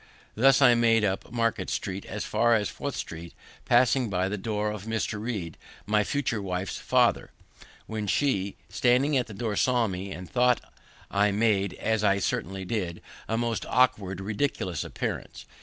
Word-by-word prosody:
Thus 135 +4 +5
I 125 -2 +8
went 115 -2 +3
up 95 +2 -2
Market 115 -2 0
street 95 0 -4
as 105 +1 -4
far 115 +2 +3
as 105 -2 0
Fourth 140 -2 -5
street, 85 +1 -7 0.3
passing 120 0 +3
by 95 0 0
the 105 - -2
door 105 +1 -2
of 105 -1 -7
Mr. 110 -1 -2
Read, 100 -9 -4 0.3
my 105 0 +2
future 125 -3 -1
wife's 95 0 -3
father; - - +2 0.6
when 110 -1 -4
she, 100 -5 +1
standing 125 +8 +2
at 125 -3 +1
the 110 - -9
door, 110 -1 -2
saw 125 +1 +2
me, 95 -1 -4
and 90 -1 -7
thought 125 0 +3 0.5
I 100 +1 +3
made, 100 -2 +1
as 110 -1 0
I 100 -1 +4
certainly 95 0 -2
did, 90 -5 -3 0.3
a 110 - 0
most 115 -1 -1
awkward, 100 -7 +2
ridiculous 95 - -2
appearance. - - -5
105 Hz, 165 wpm, -27 LUFS, 95-120 Hz, 0.6 s, I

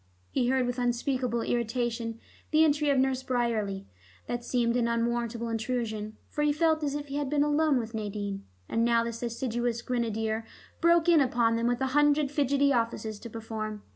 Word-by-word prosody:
He 245 - +1
heard 260 0 +2
with 245 +1 -2
unspeakable 245 0 0
irritation 235 -1 -1 0.3
the 310 +1 +5
entry 295 -1 +2
of 280 - +3
Nurse 260 0 +2
Bryerley. 225 -6 -1 0.4
That 240 0 -3
seemed 235 -1 +1
an 240 -1 +2
unwarrantable 235 0 -1
intrusion, 220 -2 -3
for 295 - -4
he 295 0 +3
felt 315 +1 +2
as 285 -1 -1
if 290 -1 -5
he 280 - -3
had 290 -2 -1
been 290 0 +2
alone 295 -1 +3
with 230 -1 -4
Nadine, 205 -2 -4 0.2
and 230 - 0
now 235 0 +3
this 230 0 -5
assiduous 240 0 -2
grenadier 225 -2 -1 0.4
broke 340 0 +4
in 335 -3 +6
upon 235 -3 +2
them 230 +1 0
with 245 +1 0
a - - +2
hundred 295 -1 +3
fidgety 280 -1 +2
offices 230 -3 -1
to 235 - -8
perform. 215 -1 -5
240 Hz, 180 wpm, -28 LUFS, 230-280 Hz, 0.4 s, in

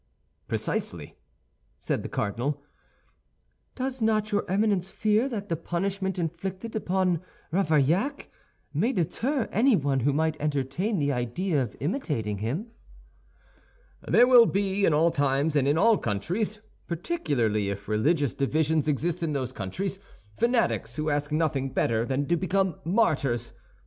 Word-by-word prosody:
"Precisely," - - -3 0.6
said - - -2
the - - -6
cardinal. 135 +8 -2 1.1
"Does 260 -1 -3
not 215 -1 +1
your 205 -3 0
Eminence 195 -1 +1
fear 215 +6 +1
that 205 -5 -4
the 165 - 0
punishment 190 +3 -2
inflicted 185 +6 -4
upon 185 -4 +1 0.3
Ravaillac 175 - +1 0.4
may 215 - +1
deter 230 - -1
anyone 190 - +3
who 135 +4 +2
might 155 +1 0
entertain 150 - -1
the 145 -2 +1
idea 135 +7 -1
of 120 -5 -4
imitating 140 - -2
him?" 150 - -3 1.4
"There 245 - +6
will 245 -2 +7
be, 200 0 +1
in 160 - +3
all 165 +3 +4
times 145 +2 +1
and 140 -2 +3
in 145 +2 +3
all 220 +4 +4
countries, 185 - -2 0.3
particularly 135 - -1
if 100 0 -5
religious 140 +7 +1
divisions 155 +2 +1
exist 155 +4 0
in 160 -3 -1
those 130 -3 -2
countries, 175 - -4 0.4
fanatics 230 - +1
who 155 0 -1
ask 145 +1 -1
nothing 150 -4 0
better 115 0 +1
than 140 +1 0
to 170 - +2
become 185 0 0
martyrs. 145 - +1
165 Hz, 135 wpm, -27 LUFS, 140-200 Hz, 1.4 s, will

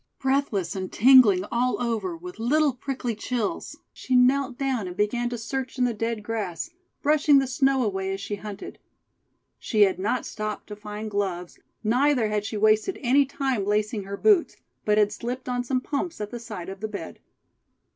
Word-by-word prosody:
Breathless 265 -10 0
and 185 -1 -4
tingling 225 -6 +6
all 250 +1 +1
over 245 - -2
with 360 -2 -10
little 290 +5 +2
prickly 255 -1 -3
chills, 225 0 -3 0.2
she 255 - -2
knelt 255 +1 +3
down 260 -7 -1
and 180 0 -8
began 240 +4 0
to 240 - -4
search 260 +3 -4
in 255 - +2
the 240 - 0
dead 225 0 -3
grass, 215 - -4 0.3
brushing 295 -1 +5
the 270 - +3
snow 265 0 +2
away 190 -3 -2
as 195 - -3
she 205 +1 -4
hunted. 205 0 -8 0.8
She 215 -3 0
had 190 -2 +4
not 210 +6 -1
stopped 215 -1 -5
to 210 - -6
find 210 +1 -7
gloves, 185 -4 -3 0.2
neither 245 +1 +2
had 210 -1 -1
she 215 - -4
wasted 215 - +3
any 270 +3 +4
time 265 -6 -1
lacing 210 0 0
her 200 +1 -5
boots, 405 - +3 0.3
but 210 0 +3
had 210 -1 +3
slipped 250 +2 -5
on 245 -1 -1
some 255 +1 -1
pumps 310 +5 -3
at 210 -1 -5
the 240 - -5
side 210 -6 -7
of 195 0 -8
the 215 - -3
bed. 210 -1 -7
230 Hz, 185 wpm, -25 LUFS, 210-265 Hz, 0.8 s, tingling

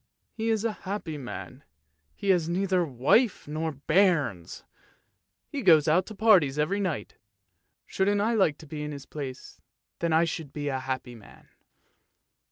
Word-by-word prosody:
He's 220 -1 -1
a 230 - +1 0.2
happy 195 -6 -3
man, 130 +1 -8 0.5
he 200 - +1
has 170 -3 +1
neither 185 0 +1
wife 155 - +2
nor 155 +2 -2
bairns, 145 - +1 0.8
he 285 - -5
goes 160 - +5
out 175 +4 +3
to 215 - -8
parties 190 -10 +4
every 175 +7 0
night, 170 - -3 0.7
shouldn't 200 +1 +1
I 220 +3 +1
like 190 -9 +2
to 160 - -13
be 150 0 -6
in 150 0 -4
his 140 -1 -9
place, 135 -4 -8 0.4
then 170 -1 0
I 160 +1 +4
should 160 -4 -4
be 145 -1 -3
a 135 -1 -2
happy 130 -1 -4
man! 110 -4 -16
160 Hz, 155 wpm, -27 LUFS, 145-195 Hz, 0.8 s, goes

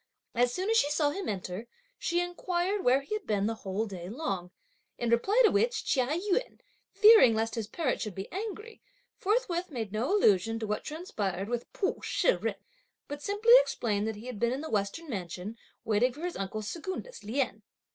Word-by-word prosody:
As 245 0 +2
soon 370 +9 -2
as 455 - +4
she 290 - +3
saw 295 -1 +2
him 385 +3 -4
enter, 190 +2 -4 0.3
she 345 0 +1
inquired 355 +2 -1
where 260 +2 +4
he 280 - -6
had 425 -2 -4
been 205 -2 +1
the 225 - 0
whole 200 +3 -2
day 185 -4 -7
long, 195 - -3 0.5
in 235 -1 -1
reply 385 - +3
to 435 - +5
which 465 +4 +1
Chia 255 -3 +2
Yün, 380 - -1 0.3
fearing 430 - +7
lest 225 +1 -1
his 225 -3 -3
parent 265 +3 -1
should 210 -4 -4
be 195 +1 -5
angry, 430 +3 -6 0.4
forthwith 375 -4 0
made 230 -8 -4
no 225 - -1
allusion 225 - +3
to 225 - -3
what 210 0 -2
transpired 210 - -3
with 240 0 -3
Pu 390 - -1
Shih - - +2
jen, - - -1 0.5
but 290 0 -6
simply 415 +7 +4
explained 215 - -1
that 220 - -2
he 210 +3 -11
had 250 -5 -6
been 235 0 +2
in 265 +3 -2
the 315 - -6
western 210 +11 -1
mansion, 190 - -5 0.3
waiting 225 +3 +3
for 295 - -11
his 355 0 -3
uncle 195 +2 -4
Secundus, 375 - -6
Lien. 220 -1 -1
250 Hz, 195 wpm, -30 LUFS, -, 0.5 s, fearing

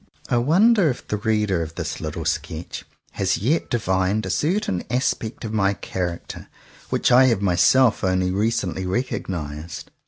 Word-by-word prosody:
I 120 - +2
wonder 180 - +4
if 125 - -5
the 105 - -1
reader 105 -4 0
of 80 0 -6
this - - -4
little - - -4
sketch - - -4 0.3
has 95 -1 0
yet 140 - 0
divined 95 -1 0
a - - -2
certain 155 - 0
aspect 120 -1 -1
of 110 - -5
my 100 -2 +2
character 90 -3 -5 0.4
which - - +1
I 125 +2 +7
have 115 -6 +2
myself 110 +6 +4
only 95 -1 +1
recently 100 -2 -1
recognized 85 - -4
105 Hz, 150 wpm, -22 LUFS, 95-125 Hz, 0.4 s, I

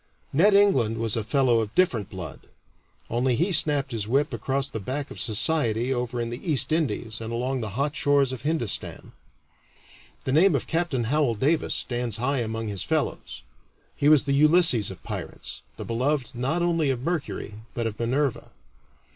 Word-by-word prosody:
"Ned" 200 +8 +5
England 130 - +3
was 115 -2 -1
a 115 - -1
fellow 120 0 +2
of 110 0 -4
different 120 - +2
blood 90 -6 -9 0.6
only 120 +2 +1
he 175 - +1
snapped 145 -5 +3
his 110 -3 -2
whip 140 +4 +1
across 135 +4 -1
the 115 - -5
back 135 +7 -4
of - - -8
society 120 0 +1
over 125 -1 -3
in 115 0 -3
the 120 - -6
East 155 -3 +1
Indies 115 -8 -1
and 115 0 -5
along 125 +2 -2
the 110 -1 -5
hot 145 +2 0
shores 140 -2 +2
of 125 - -6
Hindustan. 145 -6 -2 1.1
The 130 - 0
name 165 +4 +5
of 135 - -1
Capt. 170 -1 -1
Howel 130 +1 +1
Davis 150 +8 +1
stands 120 -3 -1
high 135 +4 0
among 115 -1 -3
his 100 -3 -3
fellows. - - -2 0.5
He 145 - +2
was 155 -3 +6
the 140 -1 -1
Ulysses 150 - +4
of 95 - -10
pirates, - - -6 0.2
the - - -6
beloved 130 +3 -1
not 135 +8 -1
only 165 -4 +1
of 125 -2 -2
Mercury, 145 -10 -4
but 115 - -2
of 110 -2 -4
Minerva. 130 +3 -1
130 Hz, 175 wpm, -25 LUFS, 115-150 Hz, 1.1 s, was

